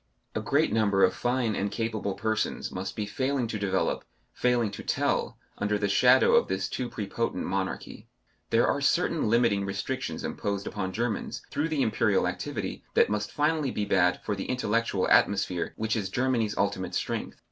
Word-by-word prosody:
A - - -2
great - - +2
number 100 -3 +3
of - - +5
fine 120 -2 0
and 100 - -1
capable 110 -3 -2
persons 110 -1 -1
must 95 +1 -5
be 105 - -2
failing 130 +4 -1
to 110 -2 -4
develop, 95 -2 0 0.3
failing 120 -4 +1
to - - -7
tell, - - 0 0.2
under 105 0 +1
the 100 0 0
shadow 100 - +5
of - - +5
this 95 0 -1
too 125 -1 -3
prepotent 105 -1 -3
monarchy. 95 0 -4 0.4
There - - +4
are - - +1
certain - - +2
limiting 115 -3 +3
restrictions 100 +7 -3
imposed 100 -1 -3
upon 95 -2 -3
Germans 115 +2 -3
through 155 +3 -1
the 150 -4 +1
Imperial 110 - +2
activity, - - -4
that - - +4
must 105 -1 -1
finally 150 -1 +1
be 105 -4 -2
bad 90 -2 +3
for 105 - -1
the 95 - -4
intellectual 115 -5 0
atmosphere 95 -3 +2
which 110 +1 -1
is 100 -4 -2
Germany's 120 -2 0
ultimate 100 -2 -1
strength. - - -3
105 Hz, 170 wpm, -28 LUFS, 100-120 Hz, 0.4 s, of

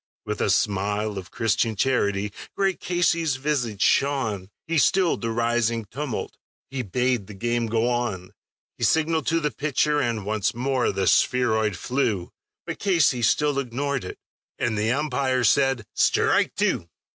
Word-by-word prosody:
With - - -3
a - - +1
smile 105 +1 0
of 95 0 -11
Christian 115 0 0
charity 100 -5 0 0.2
great 195 -2 0
Casey's 170 -4 +1
visage 130 -8 -1
shone; 110 -10 +1 0.2
He 165 -1 +1
stilled 185 +3 +2
the 115 - -2
rising 115 0 0
tumult; 130 +3 -5 0.3
he 135 -1 -2
bade 125 -1 -1
the 105 - -10
game 120 +3 -1
go 115 +1 +1
on; 120 -7 -2 0.5
He - - -3
signaled 160 -1 +2
to 165 0 +2
the 150 -2 -1
pitcher, 150 0 0
and 115 -5 -2
once 110 +1 -1
more 130 +1 0
the 95 -1 -1
spheroid 110 -4 +2
flew, 110 -6 -1 0.3
But - - -5
Casey 165 -11 +2
still 145 +5 +2
ignored 140 +1 -2
it; 90 - -7 0.4
and 115 -2 -1
the 110 +2 +1
umpire 135 -2 0
said, 135 -1 +3
"Strike - - +2
two." 85 - 0
120 Hz, 150 wpm, -24 LUFS, 105-140 Hz, 0.5 s, said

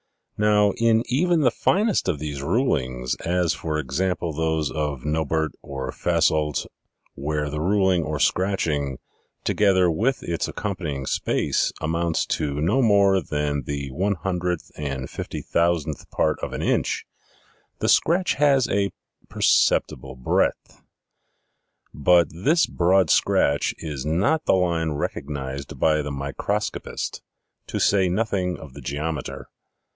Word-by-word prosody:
Now, 105 -1 +3
in 115 0 +3
even 165 +6 +2
the 125 -4 +4
finest 205 - +1
of 85 - 0
these 75 -2 -5
rulings, 65 - 0
as, 90 -1 0
for 80 -1 -3
example, 85 +4 -1
those 80 -1 0
of 75 -4 -3
Nobert 80 0 0
or 65 -2 -5
Fasoldt, 75 -2 +1 0.5
where 75 +1 -2
the 75 +1 -3
ruling 95 0 +2
or 75 -2 -3
scratching, 75 -5 0 0.5
together 95 -4 +3
with 115 +11 0
its 85 -1 -2
accompanying 80 -10 -4
space, - - 0
amounts 80 +1 0
to 75 -1 -2
no 95 - +2
more 100 -4 +4
than 75 -3 -2
the 70 -1 -4
one 100 +8 0
hundred 90 -2 -2
and 70 -3 -4
fifty - - -6
thou 85 +1 +4
sandth 75 -1 -7
part - - 0
of - - -5
an - - -3
inch, - - 0 0.7
the - - -2
scratch 180 +3 +3
has 135 -3 +3
a 100 -2 +1 0.4
perceptible 65 -1 +2
breadth. 65 - -1 1.1
But 85 +2 +4
this 140 - +2
broad 90 0 +2
scratch 70 0 +2
is 75 -5 -5
not 100 - +1
the - - +4
line 85 -4 0
recognized 70 -1 -5
by 75 -1 +3
the 75 - -4
microscopist, 70 0 -3 0.5
to - - -3
say 95 -2 +3
nothing 95 -2 -1
of 75 -4 -11
the - - -10
geometer. 75 -1 -4
80 Hz, 130 wpm, -24 LUFS, 75-95 Hz, 1.1 s, the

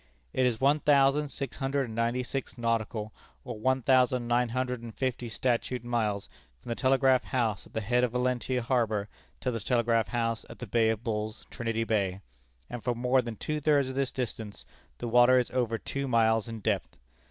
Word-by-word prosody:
"It 130 -1 +3
is 115 -3 -1
one 140 +3 +4
thousand 145 0 +3
six 140 -3 -4
hundred 135 +1 0
and 115 - -8
ninety 115 +2 0
six 130 0 -5
nautical, 115 -2 -1 0.3
or - - -6
one 130 +2 +1
thousand 125 -2 +3
nine 120 0 +2
hundred 125 0 -2
and 115 -2 -9
fifty 125 -2 -2
statute, 125 +1 -1
miles 110 -4 -1 0.3
from - - -12
the 115 - -1
Telegraph 130 -1 +3
House 115 -5 -1
at - - -23
the 110 - -1
head 120 +4 +1
of 120 -2 0
Valentia 125 0 0
harbor 110 -4 0 0.3
to 125 - 0
the 115 - -3
Telegraph 115 0 +1
House 115 -2 -1
at - - -10
the 125 - -6
Bay 115 +1 +2
of 110 0 -1
Bulls, 110 -2 -3
Trinity 115 -1 -2
Bay, 100 -4 0 0.5
and 120 -2 -7
for 125 -1 0
more 125 +2 +2
than 115 -2 -6
two 150 +7 -3
thirds 145 -3 +3
of 130 - -6
this 135 -1 0
distance 110 - -5 0.3
the 120 - -4
water 120 +2 +6
is 125 - +1
over 120 -3 0
two 140 +4 -4
miles 115 -2 +3
in 115 -1 -6
depth. 100 -3 -1
120 Hz, 200 wpm, -29 LUFS, 115-130 Hz, 0.5 s, water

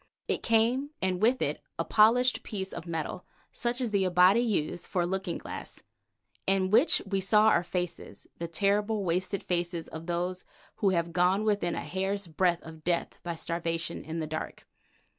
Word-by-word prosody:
It - - -1
came, 235 +5 +2
and 185 -1 -1
with 245 +4 +3
it - - -2 0.2
a - - -1
polished 245 +4 +4
piece 190 -3 -5
of 170 - -7
metal, 165 +2 -4 0.3
such 240 +1 0
as 245 -4 -1
the 200 -2 +2
Abati 180 +4 +5
use 180 -7 -1
for 180 - 0
a - - 0
looking 190 -1 -2
glass, - - -8 0.6
in 190 -1 +2
which 240 +9 +5
we 195 -1 -1
saw 210 +3 +5
our 180 - +3
faces, 180 -1 -5
the 170 - -3
terrible, 205 +4 +1
wasted 185 +3 -1
faces 175 -1 -2
of 160 +1 -8
those 180 +1 -2 0.3
who 200 - +2
have 170 -2 0
gone 180 +4 +3
within 200 -6 +1
a - - -3
hair's 195 +1 -2
breadth 175 +1 +1
of 160 -1 -11
death 170 0 -1
by 170 -1 -4
starvation 165 0 -3
in 160 +1 -5
the 160 - -2
dark. 155 0 -6
185 Hz, 180 wpm, -29 LUFS, 170-210 Hz, 0.6 s, Abati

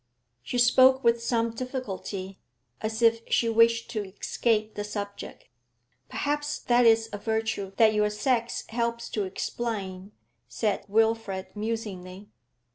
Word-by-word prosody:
She 245 - -4
spoke 260 +2 +5
with 235 0 +3
some 230 -1 0
difficulty, 210 -6 -5 0.4
as 220 +1 -2
if 230 0 +5
she 230 - +2
wished 230 0 +3
to 215 -3 -2
escape 215 +2 -1
the 205 - -4
subject. 205 -1 -7 0.6
'Perhaps 295 0 -2
that 240 0 +4
is 225 0 +4
a 205 - -4
virtue 220 -3 -2
that 220 -1 +5
your 210 0 +2
sex 235 +2 -1
helps 235 0 -2
to 210 -2 -1
explain,' 195 -1 -4 0.4
said 210 -3 -1
Wilfrid, 220 -3 0
musingly. 205 -3 -5
225 Hz, 125 wpm, -27 LUFS, 205-235 Hz, 0.6 s, spoke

